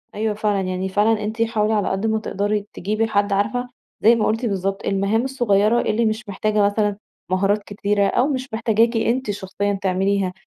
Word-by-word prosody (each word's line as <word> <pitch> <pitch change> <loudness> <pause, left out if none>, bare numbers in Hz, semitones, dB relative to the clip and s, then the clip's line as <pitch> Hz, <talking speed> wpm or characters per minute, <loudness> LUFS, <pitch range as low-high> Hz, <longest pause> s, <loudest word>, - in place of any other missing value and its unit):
أيوه 215 +1 -1
فعلًا 205 -2 0
يعني 185 0 -2
فعلًا 210 +2 +2
أنتِ 220 +2 -3
حاولي 220 -1 +1
على 205 -2 +1
قد 195 +3 -2
ما 220 0 +1
تقدري 205 0 -2
تجيبي 215 +4 -1
حد 205 -1 +1
عارفة، 220 +5 0 0.3
زي 230 +2 +6
ما 220 - 0
قلتِ 225 +3 0
بالضبط 195 -2 -2
المهام 200 +4 +1
الصغيّرة 235 -4 +2
اللي 225 +2 0
مش 220 0 -2
محتاجة 210 +2 0
مثلًا 205 0 0 0.3
مهارات 200 +2 +1
كتيرة، 205 0 0
أو 250 - +2
مش 260 -4 -3
محتاجاكِ 225 +1 +2
أنت 230 0 0
شخصيًا 200 +1 -2
تعمليها، 190 0 0
210 Hz, 180 wpm, -21 LUFS, 200-225 Hz, 0.3 s, زي